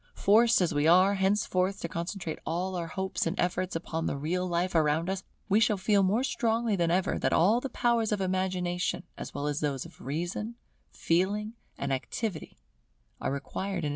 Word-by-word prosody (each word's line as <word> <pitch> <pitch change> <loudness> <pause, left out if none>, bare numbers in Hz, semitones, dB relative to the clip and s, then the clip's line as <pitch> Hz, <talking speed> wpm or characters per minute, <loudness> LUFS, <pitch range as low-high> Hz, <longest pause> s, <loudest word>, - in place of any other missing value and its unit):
Forced 225 +2 +4
as 175 -2 +1
we 145 +1 +2
are 185 +4 +6
henceforth 190 -1 +1
to - - -2
concentrate 170 0 -4
all 180 +3 -2
our 170 -2 -3
hopes 190 +1 -2
and 165 - -3
efforts 180 +1 0
upon 165 -1 -3
the - - -2
real 180 +6 -1
life 175 +1 0
around 160 +2 +2
us, 190 0 -3 0.3
we 205 +1 +4
shall 215 -2 +3
feel 200 +1 +3
more 200 +6 +2
strongly 235 -4 0
than 170 -3 +1
ever 180 +2 +1
that - - +1
all 210 +8 +4
the 270 - -4
powers 235 -2 +1
of 210 - +1
Imagination 185 -1 -1
as - - -8
well 145 - -2
as 150 0 -1
those 140 -3 -2
of - - -14
Reason, 175 - -3 0.4
Feeling, 205 +6 0 0.2
and 140 -1 -2
Activity, 180 - -4 0.6
are - - -2
required 190 +8 -4
in - - -1
its 175 - -3
service. 150 - 0
185 Hz, 195 wpm, -29 LUFS, 165-205 Hz, 0.6 s, are